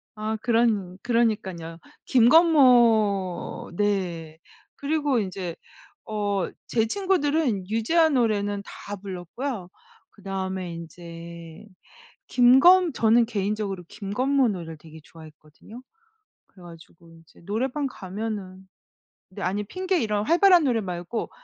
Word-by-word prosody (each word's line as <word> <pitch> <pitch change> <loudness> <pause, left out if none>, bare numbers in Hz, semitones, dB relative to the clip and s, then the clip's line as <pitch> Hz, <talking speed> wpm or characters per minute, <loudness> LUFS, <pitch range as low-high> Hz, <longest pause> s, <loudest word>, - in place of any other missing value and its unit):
아 215 +1 -3
그런 225 -6 +1
그러니깐요. 205 -9 -1 0.4
김건모 235 - +4
네. 175 -6 -2 0.4
그리고 285 -3 0
인제 185 -4 -4 0.5
어 205 -3 -2 0.2
제 225 -1 0
친구들은 295 - 0
유재하 315 +10 +2
노래는 205 -6 0
다 205 - -8
불렀고요. 190 +3 -6 0.4
그다음에 190 -3 -5
인제 170 +1 -10 0.6
김건 290 +8 +5
저는 230 0 +3
개인적으로 205 -3 -3
김건모 245 +6 0
노래를 170 -5 -5
되게 160 +1 -14
좋아했거든요. 155 - -15 0.7
그래 185 - -19
가지고 170 0 -15
인제 165 -1 -19
노래방 260 +7 -2
가면은 190 -3 -6 0.6
네. 195 +1 -9
아니 200 +3 -1
핑계 370 - -1
이런 210 -2 -1
활발한 350 - +5
노래 240 -5 +1
말고 180 +3 -5
205 Hz, 250 characters per minute, -25 LUFS, 180-245 Hz, 0.7 s, 김건